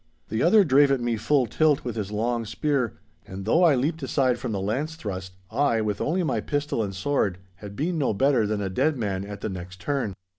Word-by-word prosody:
The 110 Hz, -, -1 dB
other 200 Hz, +5 st, +6 dB
drave 145 Hz, -3 st, +5 dB
at 135 Hz, -1 st, +2 dB
me 120 Hz, -1 st, 0 dB
full 130 Hz, +4 st, +2 dB
tilt 150 Hz, +5 st, +2 dB
with 120 Hz, -3 st, -4 dB
his 105 Hz, -3 st, -3 dB
long 115 Hz, +2 st, -1 dB
spear, 130 Hz, 0 st, -1 dB, 0.3 s
and 95 Hz, 0 st, -7 dB
though 160 Hz, +11 st, +3 dB
I 160 Hz, -5 st, +6 dB
leapt 155 Hz, +6 st, -1 dB
aside 130 Hz, -2 st, +1 dB
from -, -, -4 dB
the 100 Hz, -, -2 dB
lance 130 Hz, +11 st, -2 dB
thrust, 95 Hz, -, -6 dB, 0.2 s
I, 125 Hz, -1 st, +2 dB
with 105 Hz, -1 st, -2 dB
only 180 Hz, +4 st, 0 dB
my 160 Hz, -, 0 dB
pistol 145 Hz, -5 st, -1 dB
and 100 Hz, -3 st, -3 dB
sword, 100 Hz, -4 st, 0 dB, 0.2 s
had 100 Hz, 0 st, -9 dB
been 165 Hz, -, -1 dB
no 140 Hz, -, +1 dB
better 120 Hz, 0 st, +2 dB
than 105 Hz, 0 st, -1 dB
a 95 Hz, -, -2 dB
dead 140 Hz, +8 st, +1 dB
man 100 Hz, -5 st, -2 dB
at 100 Hz, 0 st, -8 dB
the -, -, -2 dB
next 90 Hz, -1 st, -8 dB
turn. 120 Hz, -2 st, -2 dB
120 Hz, 225 wpm, -25 LUFS, 100-145 Hz, 0.3 s, other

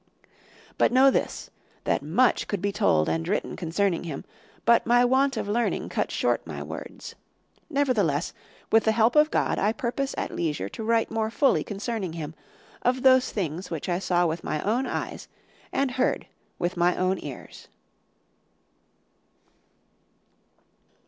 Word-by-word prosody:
"But -, -, +4 dB
know 265 Hz, +2 st, +6 dB
this, -, -, -2 dB, 0.3 s
that -, -, +1 dB
much 180 Hz, -, +2 dB
could 205 Hz, -, -2 dB
be 200 Hz, +2 st, -1 dB
told 140 Hz, -, +2 dB
and 80 Hz, 0 st, -1 dB
written -, -, -1 dB
concerning 175 Hz, +2 st, -1 dB
him, 150 Hz, -5 st, -6 dB, 0.4 s
but 235 Hz, 0 st, +4 dB
my 245 Hz, +1 st, +5 dB
want 265 Hz, +1 st, +2 dB
of -, -, -2 dB
learning 230 Hz, +3 st, 0 dB
cuts -, -, -1 dB
short -, -, +1 dB
my -, -, -6 dB
words. -, -, -8 dB, 0.6 s
Nevertheless, 225 Hz, -, +1 dB, 0.4 s
with 225 Hz, 0 st, +5 dB
the 220 Hz, -, +3 dB
help 225 Hz, +3 st, +3 dB
of 300 Hz, 0 st, +6 dB
God, -, -, 0 dB
I 210 Hz, -, +2 dB
purpose 275 Hz, +1 st, -2 dB
at -, -, -3 dB
leisure 150 Hz, -, -2 dB
to 220 Hz, -, -7 dB
write 230 Hz, 0 st, +1 dB
more 220 Hz, -1 st, 0 dB
fully 275 Hz, +4 st, +2 dB
concerning 205 Hz, -3 st, -4 dB
him, 160 Hz, -2 st, -6 dB, 0.5 s
of 250 Hz, +1 st, +1 dB
those 260 Hz, -1 st, +5 dB
things 180 Hz, -2 st, -3 dB
which 165 Hz, -4 st, -4 dB
I 175 Hz, -1 st, 0 dB
saw 175 Hz, -2 st, +2 dB
with 165 Hz, 0 st, -2 dB
my 155 Hz, -, -2 dB
own 240 Hz, +6 st, 0 dB
eyes -, -, -4 dB, 0.4 s
and 275 Hz, -1 st, 0 dB
heard 255 Hz, +1 st, 0 dB, 0.3 s
with 175 Hz, +1 st, -2 dB
my 175 Hz, +1 st, +3 dB
own 185 Hz, +1 st, +1 dB
ears." -, -, -9 dB
210 Hz, 150 wpm, -26 LUFS, 175-245 Hz, 0.6 s, know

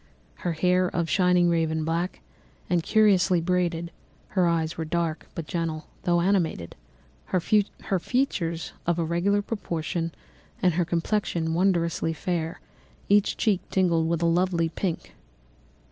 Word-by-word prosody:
Her 175 Hz, -, -2 dB
hair 180 Hz, +3 st, +2 dB
of 170 Hz, -1 st, -1 dB
a -, -, -5 dB
shining 180 Hz, +1 st, +4 dB
raven 160 Hz, -2 st, +1 dB
black, 170 Hz, +3 st, -2 dB, 0.5 s
and 175 Hz, -1 st, +3 dB
curiously 190 Hz, -3 st, +4 dB
braided; 170 Hz, -1 st, -1 dB, 0.4 s
her 185 Hz, -3 st, +2 dB
eyes 165 Hz, -1 st, 0 dB
were 165 Hz, -, -3 dB
dark, 165 Hz, 0 st, -2 dB
but 165 Hz, -, -4 dB
gentle, 160 Hz, -1 st, -3 dB, 0.2 s
although 175 Hz, -1 st, +2 dB
animated; 170 Hz, -, 0 dB, 0.5 s
her 185 Hz, -, 0 dB
features 195 Hz, -2 st, 0 dB
of 170 Hz, -1 st, +2 dB
a 170 Hz, -, 0 dB
regular 190 Hz, +5 st, +1 dB
proportion, 170 Hz, -5 st, -3 dB, 0.5 s
and 180 Hz, -2 st, +3 dB
her 175 Hz, +1 st, +1 dB
complexion 170 Hz, -1 st, -1 dB
wondrously 170 Hz, -2 st, +1 dB
fair, 165 Hz, 0 st, -3 dB, 0.5 s
each 205 Hz, 0 st, +3 dB
cheek 205 Hz, -5 st, +2 dB
tinged 170 Hz, -4 st, +2 dB
with 170 Hz, 0 st, 0 dB
a -, -, +3 dB
lovely 170 Hz, -1 st, +2 dB
pink. 170 Hz, +1 st, -4 dB
170 Hz, 135 wpm, -26 LUFS, 165-185 Hz, 0.5 s, shining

